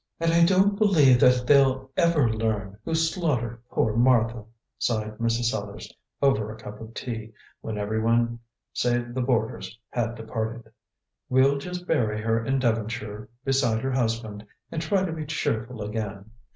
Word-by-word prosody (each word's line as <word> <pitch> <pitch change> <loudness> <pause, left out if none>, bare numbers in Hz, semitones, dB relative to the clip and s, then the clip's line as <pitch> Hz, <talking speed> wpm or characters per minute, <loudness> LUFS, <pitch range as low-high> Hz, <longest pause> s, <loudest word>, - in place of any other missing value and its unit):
"And 165 0 +1
I 170 0 +5
don't 195 +3 +3
believe 150 - +5
that 125 0 +4
they'll 135 -1 +3
ever 170 -7 +3
learn 110 -2 -2
who 165 - -2
slaughtered 155 - 0
poor 110 -1 0
Martha," 115 -2 +3 0.3
sighed 110 -2 -2
Mrs. 115 0 +1
Sellars, 100 -2 -6 0.3
over 110 -6 +2
a 110 - -9
cup 105 0 -10
of 110 +1 -10
tea, 110 -2 -5 0.3
when 110 -1 -5
everyone 115 +3 0 0.3
save 120 0 0
the 130 - -1
boarders 115 -2 -1
had 120 -1 -1
departed. 115 0 -5 0.6
"We'll 135 +2 +4
just 180 +4 -6
bury 110 -11 +1
her 115 +1 0
in 135 +3 0
Devonshire 110 -3 -2 0.2
beside 130 -5 +1
her 135 - -1
husband, 115 -4 -2 0.3
and 160 - -3
try 190 +4 +1
to 175 - -3
be 155 -2 -5
cheerful 115 -6 -2
again. 105 -1 -5
120 Hz, 150 wpm, -26 LUFS, 110-135 Hz, 0.6 s, I